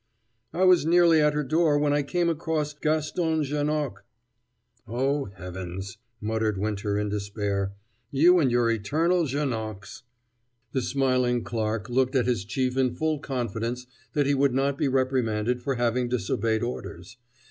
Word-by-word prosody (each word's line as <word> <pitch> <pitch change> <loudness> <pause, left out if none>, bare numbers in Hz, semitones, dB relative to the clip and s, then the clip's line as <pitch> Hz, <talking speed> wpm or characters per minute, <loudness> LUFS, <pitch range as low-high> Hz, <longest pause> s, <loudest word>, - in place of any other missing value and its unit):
"I 180 - 0
was 185 -3 +6
nearly 165 -1 +5
at 150 0 +3
her 150 - 0
door 155 +1 +2
when 145 0 +2
I 145 - +2
came 175 +5 0
across 160 -2 -1
Gaston 155 +1 0
Janoc 145 -7 -2 0.4
" 120 -1 -44
"Oh, 135 +4 0
Heavens!" 95 +2 -7 0.2
muttered 110 -1 -1
Winter 100 0 -1
in 105 0 -1
despair. 100 -1 -2 0.4
"You 175 +6 +5
and 140 -5 +3
your 120 -1 +3
eternal 160 - +1
Janocs 110 -9 -4 0.4
" 120 0 -48
The 130 - +1
smiling 125 -2 +1
Clarke 110 -2 -2
looked 130 +2 +1
at 125 - +3
his 120 -6 0
chief 130 +3 -1
in 130 -2 +1
full 155 -2 0
confidence 120 -2 -3 0.3
that 145 -3 +2
he 140 - +2
would 140 -2 +2
not 135 +1 +1
be 140 - 0
reprimanded 125 -3 0
for 135 +2 -1
having 120 0 0
disobeyed 110 0 0
orders. 115 -3 -6
125 Hz, 155 wpm, -26 LUFS, 110-145 Hz, 0.4 s, was